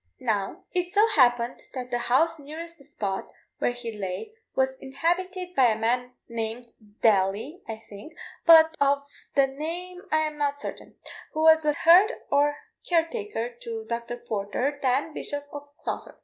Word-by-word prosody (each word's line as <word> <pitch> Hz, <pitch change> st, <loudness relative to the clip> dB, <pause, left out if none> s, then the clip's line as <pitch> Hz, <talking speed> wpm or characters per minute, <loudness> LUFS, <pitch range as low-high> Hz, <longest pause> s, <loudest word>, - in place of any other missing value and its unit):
Now, 220 Hz, -, -2 dB
it 360 Hz, -1 st, 0 dB
so 420 Hz, +3 st, +5 dB
happened 245 Hz, -, +3 dB, 0.2 s
that 250 Hz, -1 st, -5 dB
the 240 Hz, -, 0 dB
house 320 Hz, +7 st, +2 dB
nearest 325 Hz, +3 st, -8 dB
the -, -, -14 dB
spot 195 Hz, -7 st, -4 dB, 0.3 s
where -, -, +2 dB
he 245 Hz, -1 st, -6 dB
lay 195 Hz, -, -5 dB, 0.2 s
was 265 Hz, 0 st, +2 dB
inhabited 360 Hz, +6 st, -2 dB
by 265 Hz, -6 st, +5 dB
a 220 Hz, -2 st, +1 dB
man 245 Hz, +3 st, 0 dB
named 230 Hz, +1 st, -5 dB, 0.3 s
Daly, 215 Hz, -, +2 dB
I 225 Hz, 0 st, -6 dB
think 205 Hz, +10 st, -11 dB, 0.3 s
but 320 Hz, -1 st, +8 dB
of 280 Hz, 0 st, +3 dB, 0.3 s
the 275 Hz, -1 st, +6 dB
name 335 Hz, +6 st, -5 dB
I 310 Hz, -, +3 dB
am 305 Hz, -1 st, -3 dB
not 285 Hz, -1 st, 0 dB
certain -, -, -7 dB, 0.4 s
who 315 Hz, -, 0 dB
was 320 Hz, -1 st, +6 dB
a 300 Hz, -, +3 dB
herd 360 Hz, +10 st, +6 dB, 0.2 s
or 290 Hz, +1 st, +3 dB, 0.3 s
care 335 Hz, -2 st, +3 dB
taker 410 Hz, -, -4 dB
to 225 Hz, -2 st, -6 dB
Dr. 235 Hz, +1 st, -3 dB
Porter, 230 Hz, +7 st, -2 dB
then 270 Hz, +4 st, +1 dB
Bishop 290 Hz, -1 st, -5 dB
of 290 Hz, 0 st, -7 dB
Clogher. -, -, -5 dB
280 Hz, 165 wpm, -26 LUFS, 235-325 Hz, 0.4 s, but